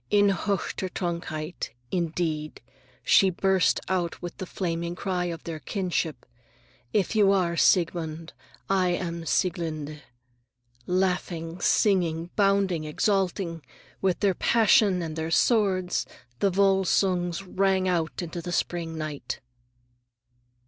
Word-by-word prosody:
In 205 Hz, -1 st, +4 dB
höchster 195 Hz, -1 st, -2 dB
Trunkenheit, 170 Hz, -4 st, -4 dB, 0.2 s
indeed, 160 Hz, -3 st, -2 dB, 0.4 s
she 195 Hz, -, +5 dB
burst 190 Hz, 0 st, +2 dB
out 175 Hz, -2 st, -1 dB
with 175 Hz, -1 st, -6 dB
the 185 Hz, -, -6 dB
flaming 170 Hz, -1 st, -3 dB
cry 180 Hz, -1 st, -2 dB
of 165 Hz, -2 st, -5 dB
their 165 Hz, -2 st, -5 dB
kinship: 175 Hz, -, -2 dB, 0.7 s
"If 205 Hz, +1 st, 0 dB
you 205 Hz, -2 st, +5 dB
are 180 Hz, -3 st, +2 dB
Siegmund, 165 Hz, -2 st, +1 dB, 0.3 s
I 185 Hz, -2 st, +2 dB
am 170 Hz, -2 st, -4 dB
Sieglinde!" 155 Hz, -5 st, -1 dB, 0.9 s
Laughing, 180 Hz, -2 st, -1 dB
singing, 175 Hz, -4 st, +2 dB
bounding, 195 Hz, -5 st, +2 dB
exulting,—with 180 Hz, +1 st, -2 dB
their 200 Hz, -2 st, +3 dB
passion 205 Hz, -3 st, +4 dB
and 160 Hz, -1 st, -5 dB
their 160 Hz, 0 st, -3 dB
sword,—the 185 Hz, -, +1 dB
Volsungs 190 Hz, -2 st, +2 dB
ran 190 Hz, 0 st, +1 dB
out 175 Hz, -1 st, -1 dB
into 170 Hz, 0 st, -5 dB
the 175 Hz, -, -5 dB
spring 170 Hz, -2 st, -2 dB
night. 155 Hz, -2 st, -5 dB
175 Hz, 105 wpm, -26 LUFS, 165-190 Hz, 0.9 s, she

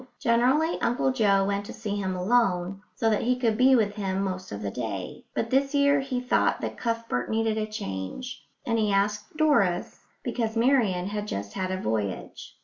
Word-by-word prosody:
Generally 255 Hz, +8 st, +2 dB
Uncle 240 Hz, +3 st, +1 dB
Joe 200 Hz, -6 st, +3 dB
went 200 Hz, 0 st, -1 dB
to -, -, -7 dB
see 210 Hz, -2 st, -4 dB
him 190 Hz, -2 st, -2 dB
alone, 190 Hz, -2 st, +1 dB
so 225 Hz, -, 0 dB
that 210 Hz, -, +1 dB
he 250 Hz, +2 st, +2 dB
could 230 Hz, -3 st, +1 dB
be 260 Hz, +3 st, +5 dB
with 210 Hz, -4 st, +2 dB
him 195 Hz, -2 st, -2 dB
most 185 Hz, -1 st, -4 dB
of 105 Hz, 0 st, -5 dB
the 100 Hz, -, -2 dB
day; 100 Hz, -5 st, -5 dB
but 230 Hz, -, -1 dB
this 275 Hz, +2 st, +2 dB
year 280 Hz, 0 st, +4 dB
he 265 Hz, -2 st, -2 dB
thought 250 Hz, 0 st, +1 dB
that -, -, -3 dB
Cuthbert 230 Hz, -, -2 dB
needed 220 Hz, 0 st, +1 dB
a 215 Hz, -, -1 dB
change, 215 Hz, -, -5 dB, 0.2 s
and 230 Hz, -1 st, +1 dB
he 210 Hz, -2 st, +2 dB
asked 210 Hz, +6 st, 0 dB
Doris, 200 Hz, -, +2 dB, 0.2 s
because 230 Hz, -2 st, -2 dB
Marian 225 Hz, -8 st, +3 dB
had 210 Hz, +1 st, -3 dB
just 100 Hz, -, -4 dB
had 185 Hz, -1 st, -2 dB
a 185 Hz, -, -1 dB
voyage. 105 Hz, -, -4 dB
215 Hz, 190 wpm, -27 LUFS, 185-245 Hz, 0.2 s, be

